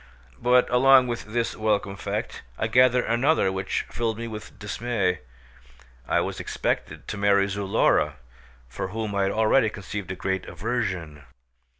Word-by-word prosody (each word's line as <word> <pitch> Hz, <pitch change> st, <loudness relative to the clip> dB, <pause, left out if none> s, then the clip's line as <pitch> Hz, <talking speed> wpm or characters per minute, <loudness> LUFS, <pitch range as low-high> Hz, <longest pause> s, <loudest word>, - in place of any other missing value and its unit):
But 125 Hz, 0 st, +4 dB
along 130 Hz, +1 st, +6 dB
with 120 Hz, -1 st, -4 dB
this 115 Hz, +2 st, -2 dB
welcome 105 Hz, -2 st, 0 dB
fact 100 Hz, -, -4 dB, 0.2 s
I -, -, -1 dB
gathered 125 Hz, +2 st, +4 dB
another 120 Hz, -3 st, +2 dB
which 95 Hz, 0 st, -2 dB
filled 115 Hz, -2 st, -2 dB
me 115 Hz, 0 st, -5 dB
with 110 Hz, -2 st, -9 dB
dismay: 105 Hz, -3 st, -1 dB, 0.9 s
I -, -, +2 dB
was -, -, -4 dB
expected -, -, -3 dB
to -, -, -4 dB
marry 100 Hz, -1 st, +3 dB
Zulora, 100 Hz, +2 st, +1 dB, 0.5 s
for 65 Hz, -, -5 dB
whom 110 Hz, +1 st, -4 dB
I 100 Hz, -, +1 dB
had 95 Hz, 0 st, +1 dB
already 110 Hz, +2 st, +3 dB
conceived 100 Hz, -2 st, -6 dB
a -, -, -4 dB
great 95 Hz, 0 st, -2 dB
aversion. 90 Hz, -, -3 dB
110 Hz, 150 wpm, -25 LUFS, 95-120 Hz, 0.9 s, along